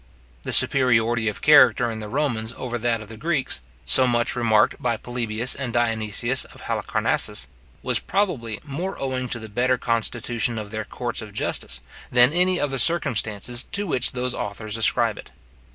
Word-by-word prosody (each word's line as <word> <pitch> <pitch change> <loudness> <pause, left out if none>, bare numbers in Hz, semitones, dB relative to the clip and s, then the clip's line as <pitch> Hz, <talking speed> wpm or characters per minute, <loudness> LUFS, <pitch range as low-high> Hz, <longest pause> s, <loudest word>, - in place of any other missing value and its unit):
The - - -4
superiority 120 -3 +4
of 105 - -4
character 125 -5 +5
in 110 - -6
the 105 -1 -7
Romans 120 -4 -2
over 120 -2 -4
that 115 -1 -1
of - - -14
the 110 +1 -11
Greeks, 145 - -1 0.2
so 130 - +7
much 120 -1 0
remarked 110 -3 +2
by 120 -2 0
Polybius 120 0 -1
and 130 -3 -4
Dionysius 115 +1 +1
of - - -15
Halicarnassus, - - 0 0.4
was - - 0
probably 135 - -2
more 165 +7 -5
owing 130 -2 -3
to 120 - -3
the 110 -1 -8
better 125 +4 0
constitution 115 0 -1
of 105 -2 -6
their 110 -1 -4
courts 120 +2 -5
of 105 -2 -10
justice, 80 - -2 0.3
than 125 +2 +5
to - - -6
any 180 0 +2
of 145 - -1
the 135 - -2
circumstances 120 -6 +1
to 205 +1 -1
which 130 -9 0
those 125 0 -2
authors 105 0 -5
ascribe 115 - +1
it. - - -12
120 Hz, 175 wpm, -23 LUFS, 110-130 Hz, 0.4 s, so